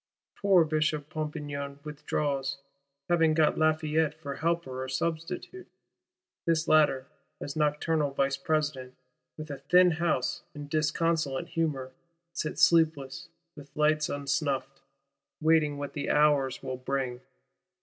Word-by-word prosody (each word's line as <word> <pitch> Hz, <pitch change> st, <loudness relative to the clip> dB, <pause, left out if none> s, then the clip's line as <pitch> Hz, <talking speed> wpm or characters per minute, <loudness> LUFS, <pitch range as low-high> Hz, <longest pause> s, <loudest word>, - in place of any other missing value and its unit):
Poor 195 Hz, -4 st, +5 dB
Bishop 155 Hz, -1 st, -1 dB
Pompignan 145 Hz, -2 st, -4 dB
withdraws; 145 Hz, -2 st, -2 dB, 0.5 s
having 165 Hz, -2 st, +3 dB
got 155 Hz, -1 st, +3 dB
Lafayette 155 Hz, -1 st, +2 dB
for 140 Hz, -3 st, -7 dB
helper 165 Hz, -6 st, -1 dB
or 130 Hz, -, -6 dB
substitute: 170 Hz, -, -4 dB, 0.8 s
this 165 Hz, -1 st, +2 dB
latter, 145 Hz, -4 st, +4 dB, 0.3 s
as 140 Hz, -, -6 dB
nocturnal 150 Hz, 0 st, +1 dB
Vice 140 Hz, 0 st, 0 dB
President, 140 Hz, -3 st, -2 dB, 0.4 s
with 155 Hz, -1 st, -7 dB
a 140 Hz, -, -6 dB
thin 180 Hz, +6 st, +5 dB
house 160 Hz, -6 st, 0 dB
in 145 Hz, -1 st, -7 dB
disconsolate 155 Hz, -1 st, 0 dB
humour, 150 Hz, -6 st, -2 dB, 0.4 s
sits 155 Hz, -2 st, -2 dB
sleepless, 155 Hz, -5 st, +3 dB, 0.3 s
with 145 Hz, -2 st, -12 dB
lights 150 Hz, 0 st, +2 dB
unsnuffed;—waiting 140 Hz, +2 st, -2 dB
what 145 Hz, 0 st, -5 dB
the 145 Hz, -, -3 dB
hours 145 Hz, -3 st, +2 dB
will 130 Hz, -1 st, -4 dB
bring. 130 Hz, -1 st, -3 dB
150 Hz, 115 wpm, -29 LUFS, 140-160 Hz, 0.8 s, Poor